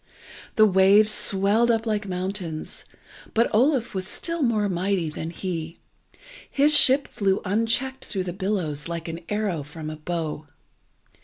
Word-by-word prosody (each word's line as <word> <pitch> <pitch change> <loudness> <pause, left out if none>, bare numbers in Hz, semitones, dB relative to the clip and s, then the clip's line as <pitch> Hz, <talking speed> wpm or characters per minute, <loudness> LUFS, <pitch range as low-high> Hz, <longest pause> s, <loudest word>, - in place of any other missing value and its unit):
The 215 - +6
waves 200 +2 +5
swelled 205 +4 +2
up 225 -1 +1
like 210 -2 -2
mountains, 180 -3 -5 0.5
but 230 +1 +2
Oluf 250 +1 +2
was 190 -1 -2
still 335 +9 -2
more 220 -5 +1
mighty 180 -3 -1
than 160 +2 -6
he. 165 -2 -5 0.7
His 295 +2 +4
ship 280 0 +6
flew 195 -4 0
unchecked 230 +6 0
through 190 -3 -3
the 180 -1 -5
billows 185 -7 -2
like 170 -1 -5
an 165 0 -5
arrow 205 -6 -1
from 155 +2 -8
a - - -6
bow. 155 -1 -4
195 Hz, 145 wpm, -24 LUFS, 170-220 Hz, 0.7 s, The